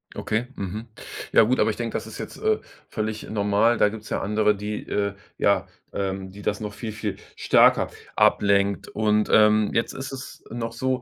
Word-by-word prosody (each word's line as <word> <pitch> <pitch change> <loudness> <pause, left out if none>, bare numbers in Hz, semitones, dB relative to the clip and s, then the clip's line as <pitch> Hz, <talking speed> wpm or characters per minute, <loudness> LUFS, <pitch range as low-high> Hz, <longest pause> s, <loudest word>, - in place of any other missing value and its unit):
Okay, 110 +3 -1
mhm. 105 +4 -5 0.4
Ja - - +7
gut, 120 +4 +2
aber 110 - +3
ich - - -6
denke, 115 -1 -4
das - - -2
ist - - -9
jetzt, - - -7
äh, 435 0 +2 0.3
völlig 110 -1 -3
normal. 105 +2 +2
Da 105 - +5
gibt's 110 0 -9
ja - - 0
andere, 105 +1 +2
die, 105 +1 -5
äh 100 -1 -1 0.2
ja, 100 -2 +3 0.3
ähm, 95 -1 -3
die 100 +1 -11
das 100 +1 -1
noch 105 -1 -5
viel, 115 0 -5
viel 105 -2 -4 0.2
stärker - - +4 0.3
ablenkt. 100 -1 +3
Und, 105 0 +1
ähm, 105 0 +5
jetzt 115 - 0
ist 135 +1 -6
es 130 -1 -9
noch 115 0 -3
so 130 +1 -1
105 Hz, 190 wpm, -24 LUFS, 100-115 Hz, 0.4 s, Ja